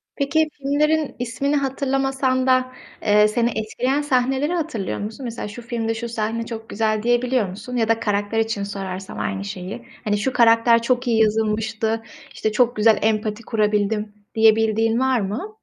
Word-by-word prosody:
Peki, 310 +2 +1
filmlerin 300 +2 0
ismini 275 +4 -1
hatırlamasan 270 -1 0
da, 255 0 +3 0.3
eee, 210 0 +5
seni 235 +2 +1
etkileyen 250 +6 -1
sahneleri 270 +3 +1
hatırlıyor 305 - -3
musun? 215 +6 -6
Mesela 235 -3 -5
şu 225 +4 -9
filmde 230 -1 -2
şu 235 +1 -5
sahne 230 +1 -2
çok 225 -1 -7
güzel 215 0 0
diyebiliyor 240 -3 +1
musun 220 +7 -7
ya 225 -2 +1
da 225 0 +2
karakter 205 0 -1
için 220 -2 -1
sorarsam 195 - -6
aynı 100 -2 -2
şeyi? 185 - -7 0.2
Hani, 210 -2 0
şu 255 +5 -1
karakter 230 0 +5
çok 250 +1 0
iyi 225 -2 +2
yazılmıştı, 220 +1 0 0.3
işte, 215 - -1
çok 240 +2 +2
güzel 215 0 +4
empati 215 0 0
kurabildim, 210 -1 0 0.2
diyebildiğin 225 +1 +3
var 260 -3 +2
mı? 350 - -5
225 Hz, 155 wpm, -22 LUFS, 215-255 Hz, 0.3 s, eee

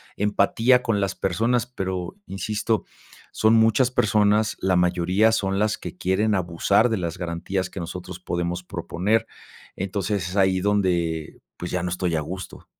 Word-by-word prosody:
empatía 115 +5 +3
con 105 -4 0
las 100 - -1
personas, 115 +6 0
pero 95 - -4
insisto, 105 +3 -2 0.5
son 110 +1 +3
muchas 115 +3 +4
personas, 105 -1 +2
la 95 -1 +2
mayoría 90 +5 +3
son 95 -2 0
las 105 0 +1
que - - -8
quieren 105 +4 +1
abusar 95 +5 +2
de 110 - 0
las 85 -1 -3
garantías 90 +2 -3
que - - -7
nosotros 90 +1 -7
podemos 85 0 -3
proponer. 100 +5 -1 0.5
Entonces, 95 -1 -2
es 90 - -7
ahí 95 -1 +3
donde 90 -6 0 0.2
pues 90 - -5
ya 90 -1 -1
no 90 - -1
estoy 90 -1 -1
a 80 - 0
gusto. 95 +5 -7
95 Hz, 155 wpm, -24 LUFS, 90-105 Hz, 0.5 s, muchas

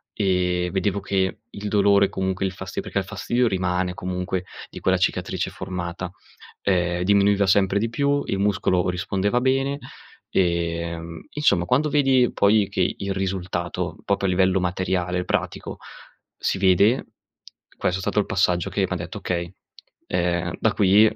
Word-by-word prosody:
e 90 -3 +1
vedevo 100 +2 0
che 95 -2 -1
il 105 -1 -6
dolore, 100 -1 +4
comunque 95 0 -2
il 95 - -1
fasti 95 0 -5
perché - - -5
il - - -2
fastidio 120 +5 0
rimane 90 -2 0
comunque, 90 0 -3 0.3
di - - -9
quella - - +3
cicatrice - - -1
formata, 90 -1 -5 0.5
ehm, 90 -2 +1
diminuiva 100 +1 +3
sempre 95 +1 +3
di 115 - 0
più, 140 +3 +1
il 95 - -1
muscolo 95 -3 +1
rispondeva 95 +5 0
bene, 135 +2 +1 0.5
ehm, 85 -2 -1
insomma, 150 -12 +2
quando 135 +10 +2
vedi 135 -4 +4
poi, 100 -1 +4
che - - 0
il 100 0 -3
risultato, 90 -2 -3
proprio 100 -1 +1
a - - +1
livello 95 +1 +3
materiale, 90 0 -1
pratico, - - -2 0.6
si - - -1
vede, 100 +6 +4 0.7
questo 90 +1 0
è - - -5
stato 105 - 0
il 100 - +1
passaggio 90 -4 +1
che - - 0
m'ha - - -2
detto: - - -6
"Okay, 85 -1 -3 0.6
ehm, 85 -1 0
da 110 - +2
qui 105 +2 +5
95 Hz, 150 wpm, -23 LUFS, 90-100 Hz, 0.7 s, qui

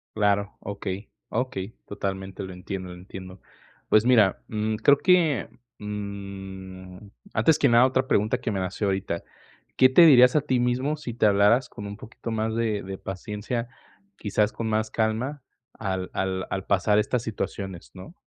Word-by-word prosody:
Claro, 100 -1 +1
okey, 100 0 -5 0.2
okey. 115 -4 -3
Totalmente 95 -1 -4
lo 95 -1 -7
entiendo, 90 0 -6
entiendo. 95 +1 -10 0.5
Pues, 110 +1 +5
mira, 110 -6 +4
mm, 110 0 -1
creo 140 +6 +5
que, 170 -8 +3 0.3
mm, 95 -2 -7 0.4
antes 160 -2 +4
que - - +4
nada, 120 +1 +6
otra 130 0 0
pregunta 105 -2 +2
que - - -2
me 100 - -1
nació 95 +2 -2
ahorita, 95 -3 -2 0.5
¿qué 130 - +6
te 130 +7 +7
dirías 125 -4 +7
a 150 - +4
ti 130 -1 0
mismo 130 +5 0
si 140 -6 -6
te 115 - +2
hablaras 105 +5 +4
con 105 -3 -8
un 100 0 -7
poquito 115 +2 -9
más 110 0 -1
de 110 -3 -1
de 95 0 -6
paciencia, 105 +5 -4 0.5
quizás 105 0 0
con 115 - -3
más 110 0 0
calma, 115 +6 -1 0.3
al 95 -3 -4
al 95 0 -1
al 95 -1 -3
pasar 105 +2 +3
estas 115 +3 0
situaciones, 95 - -5
no? 95 - -10
105 Hz, 160 wpm, -25 LUFS, 95-120 Hz, 0.5 s, te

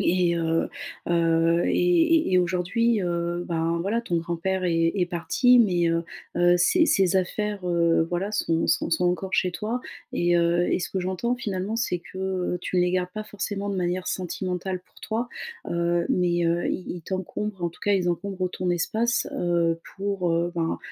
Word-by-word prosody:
Et, 175 -1 +2
heu 165 0 0 0.4
heu, 165 0 +3
et, - - +1 0.5
et - - +1
et - - +6
aujourd'hui, 185 +6 +1
heu, 175 0 -2
ben 165 0 0
voilà, 205 +6 0
ton 180 -7 -2
grand-père 175 +3 -2
est 165 -2 +2
est 180 -3 +1
parti, 245 +9 +3
mais, 180 -7 +3
heu 165 0 0 0.3
heu, 175 0 +5
ses 320 - +4
ses 190 - +3
affaires, 200 +1 -1
heu, 170 -1 +3
voilà, 175 +4 -2
sont 165 -6 0
sont - - +1
sont 180 +1 +2
encore 185 +2 -1
chez 180 - +2
toi. 220 +7 -3 0.3
Et 175 0 +2
heu, 170 +1 +2
et - - +2
ce - - -3
que 190 - -2
j'entends 190 +7 -1
finalement, 205 -2 -3
c'est 225 -6 -1
que, 170 +2 -14
heu, 185 -2 -1
tu 185 - -3
ne 180 - +4
les 180 0 +1
gardes 180 -1 0
pas 215 0 -5
forcément 205 -1 -4
de 200 - -1
manière 180 0 -1
sentimentale 185 0 -3
pour - - -21
toi, 230 +2 -2 0.4
heu, 170 0 0
mais, 175 -1 +1
heu, 170 +1 +1
ils 185 - -3
ils 175 - -5
t'encombrent 190 +1 -4
en 170 - +1
tout 170 - -17
cas, 205 - +3
ils 185 -3 +2
encombrent 185 +1 -2
ton 180 -1 -1
espace, 220 +7 0
heu, 170 -1 +1 0.2
pour, 195 -3 -1
heu, 170 +1 0
ben, 165 -1 -1
180 Hz, 190 wpm, -25 LUFS, 170-195 Hz, 0.5 s, et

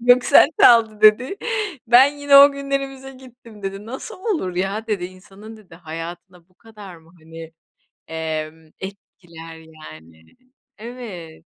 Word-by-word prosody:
"Göksel 245 +3 +5
çaldı." 225 -3 +5
dedi. 215 - +4 0.5
"Ben 245 +3 +6
yine 285 -1 +4
o 280 +1 +7
günlerimize 275 -1 -5
gittim." 245 -5 -17
dedi. 195 +2 -7
"Nasıl 255 +4 -9 0.2
olur 185 - -5
ya?" 195 +4 -3
dedi 205 -5 -3
"İnsanın" 195 +4 -13
dedi 200 -6 -18
"hayatına 170 +1 -10
bu 185 - -34
kadar 210 -3 -14
mı, 165 0 -22
hani, 165 0 -12 0.6
emm, 160 0 -6
etkiler 175 -4 -12
yani?" 80 - -16 0.5
Evet. 210 -9 -10
195 Hz, 125 wpm, -20 LUFS, 165-240 Hz, 0.6 s, o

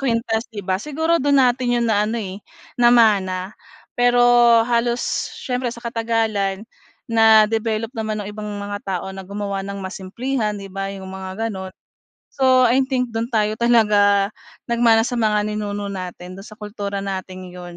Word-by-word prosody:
kwintas, 230 -3 -1
'di 205 -3 -7
ba, 185 - +1
siguro 320 +2 0
do'n 285 0 +3
natin 250 -1 +2
'yon 235 - 0
na 210 -2 +2
ano, 230 +2 -2
eh, 195 -2 -6 0.4
namana. 210 -6 +3 0.4
Pero 245 0 +3 0.5
halos 240 0 +1 0.4
siyempre 250 -1 -2
sa 235 - -9
katagalan 225 -4 -1 0.4
na 220 -1 +6
develop 225 0 -2
naman 215 -2 -3
nung 205 - -6
ibang 210 0 -7
mga 205 0 -5
tao 190 -2 -3
na 190 - -7
gumawa 200 0 -4
ng 200 0 -6
mas 190 +1 -6
simplihan, 225 +2 -2
'di 195 - -8
ba, 195 0 -4
'yong 195 -1 -8
mga 190 +3 -5
gano'n. 190 -3 -6 0.6
So, 260 -1 +3
I 245 +3 +3
think 250 -2 -1
dun 225 0 -2
tayo 215 -1 +1
talaga 210 -4 +3 0.4
nagmana 230 -1 +4
sa 245 +2 -2
mga 210 -2 +2
ninuno 205 -1 -4
natin 185 -1 -7
do'n 195 - -10
sa 215 - -12
kultura 205 -2 -5
natin 185 -1 -6
'yon. 175 -1 -10
215 Hz, 165 wpm, -21 LUFS, 195-235 Hz, 0.6 s, na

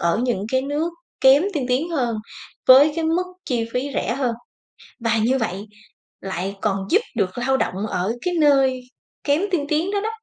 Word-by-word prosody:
ở 170 +5 +1
những 210 -5 -1
cái 260 0 +2
nước 300 +5 -2 0.3
kém 270 +4 +6
tiên 265 -4 -1
tiến 270 +7 0
hơn 245 -8 -1 0.5
với 280 +4 +8
cái 325 - -1
mức 335 +3 +1 0.2
chi 240 -5 -1
phí 270 +3 -1
rẻ 235 - -1
hơn. 250 -4 -1 0.7
Và 230 -1 +1
như 245 +5 +2
vậy 205 -3 -3 0.6
lại 190 +1 -4
còn 195 -2 -1
giúp 410 +6 +4
được 195 -1 -1
lao 265 +2 +1
động 200 -1 -2
ở 190 +3 -1
cái 360 - -1
nơi 270 -3 +3 0.4
kém 290 +4 +2
tiên 300 -5 0
tiến 320 +6 0
đó 405 -1 0
đó 440 - -2
260 Hz, 190 wpm, -22 LUFS, 220-295 Hz, 0.7 s, với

